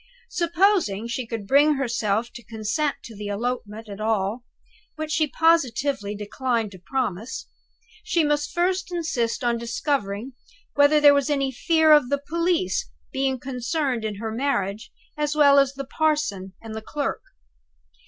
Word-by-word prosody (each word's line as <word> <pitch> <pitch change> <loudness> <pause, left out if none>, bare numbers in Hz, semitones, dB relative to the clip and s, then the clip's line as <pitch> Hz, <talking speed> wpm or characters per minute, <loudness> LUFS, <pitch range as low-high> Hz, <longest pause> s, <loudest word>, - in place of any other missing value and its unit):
Supposing 340 - +2
she 235 +1 -3
could 225 -3 -5
bring 290 +6 +5
herself 230 -4 -1
to 240 - -10
consent 220 +7 -1
to 225 - -10
the 205 0 -6
elopement 220 0 -3
at 200 0 -8
all 215 +1 0 0.5
which 310 0 -4
she 310 -1 +2
positively 280 -9 +1
declined 225 +1 -2
to 185 - -12
promise 225 0 -3 0.6
she 335 - +1
must 295 0 0
first 370 +2 0
insist 290 -8 -1
on 235 -1 +1
discovering 235 -1 -2 0.4
whether 285 +1 +5
there 290 -1 +8
was 280 +1 +1
any 275 -2 +1
fear 320 +5 +3
of 295 -5 +6
the 285 - +2
police 335 +5 -1 0.2
being 265 0 0
concerned 255 0 -2
in 215 -1 -3
her 220 +2 -4
marriage 220 -5 -2 0.3
as 300 0 -1
well 285 -2 +6
as 275 0 +2
the 275 0 -5
parson 265 -12 -1
and 225 -1 -7
the 220 - -5
clerk. 285 +5 -3
265 Hz, 150 wpm, -24 LUFS, 220-300 Hz, 0.6 s, there